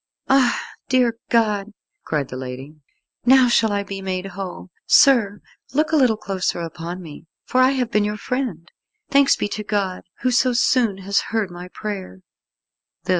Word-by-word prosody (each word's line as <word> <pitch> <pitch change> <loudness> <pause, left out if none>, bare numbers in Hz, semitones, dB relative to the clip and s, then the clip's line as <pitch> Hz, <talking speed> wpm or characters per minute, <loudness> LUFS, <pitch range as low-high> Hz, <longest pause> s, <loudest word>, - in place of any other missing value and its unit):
"Ah, 265 -2 +4 0.3
dear 245 -3 +2
God," 215 -3 +1 0.3
cried 145 -4 -2
the - - -7
lady, 130 +3 -7 0.5
"now 260 +1 +6
shall 225 -2 +3
I 200 0 0
be 195 -1 -7
made 185 -1 -3
whole. 190 -1 -7 0.2
Sir, 225 -7 +5 0.3
look 310 +2 +2
a - - +3
little 250 -7 +3
closer 190 -4 -2
upon 170 +2 -6
me, 160 0 -11 0.2
for 255 - +2
I 255 - +6
have 250 -3 -1
been 210 - +2
your 210 0 -2
friend. 235 - -3 0.4
Thanks 280 0 +5
be - - -2
to 210 +1 -4
God, 200 -3 -2 0.2
who 255 - +1
so 255 0 +3
soon 235 -4 +2
has 200 0 +2
heard 220 -5 -1
my 175 +1 -8
prayer." 190 -1 -7
205 Hz, 165 wpm, -21 LUFS, 185-250 Hz, 0.5 s, now